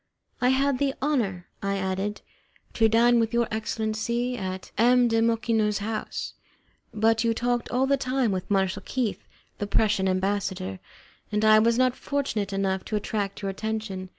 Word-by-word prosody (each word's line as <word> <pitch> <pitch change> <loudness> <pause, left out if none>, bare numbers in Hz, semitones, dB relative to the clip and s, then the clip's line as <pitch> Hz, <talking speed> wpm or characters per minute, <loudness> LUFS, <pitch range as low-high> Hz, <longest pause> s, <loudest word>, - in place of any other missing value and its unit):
"I 250 - +4
had 270 0 +2
the 275 -1 0
honour," 220 -11 -1 0.2
I 200 0 -1
added, 190 +2 -2 0.5
"to 225 -1 +3
dine 235 +2 +4
with 225 +1 0
your 235 -1 +2
excellency 220 +3 -2
at 190 -4 -5
M. 245 +2 +4
de 225 -1 +2
Mocenigo's 225 -2 +1
house, 215 +1 -4 0.6
but 225 +1 +2
you 230 -1 +1
talked 240 0 -1
all 255 +2 +1
the 275 +1 +2
time 255 -3 0
with 185 +1 -3
Marshal 195 -1 +1
Keith, 245 -6 -3 0.3
the 205 - -2
Prussian 205 -2 +2
ambassador, 185 - -1 0.5
and 210 +1 +1
I 215 0 +7
was 230 +1 +3
not 255 0 +3
fortunate 260 -10 -2
enough 195 -1 -1
to 215 - -3
attract 205 -1 -3
your 195 - -1
attention. 205 -2 -4
220 Hz, 160 wpm, -26 LUFS, 195-240 Hz, 0.6 s, I